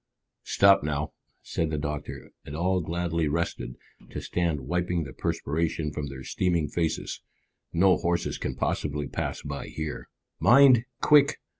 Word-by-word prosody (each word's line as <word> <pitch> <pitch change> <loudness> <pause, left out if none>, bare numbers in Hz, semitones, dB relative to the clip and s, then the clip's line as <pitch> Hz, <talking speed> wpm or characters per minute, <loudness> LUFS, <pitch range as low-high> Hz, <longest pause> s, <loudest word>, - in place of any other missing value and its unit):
"Stop 100 0 +5
now," 75 0 -2 0.3
said 80 -1 -1
the 80 - -2
doctor, 75 0 -5
and 70 - -8
all 90 +3 +1
gladly 85 0 -1
rested, 70 -6 -2 0.3
to - - -5
stand 85 -5 -1
wiping 90 +4 -1
the 70 - -8
perspiration 80 0 -1
from 70 0 -4
their 65 -1 -8
streaming 85 +1 0
faces. 80 -2 -2 0.5
"No 90 +2 +4
horses 85 0 -1
can 65 - -3
possibly 75 0 -2
pass - - -4
by 70 -1 -5
here." 80 -1 -5 0.3
"Mind! 120 +5 +7 0.2
Quick! 150 -1 +5
80 Hz, 140 wpm, -27 LUFS, 75-90 Hz, 0.5 s, Mind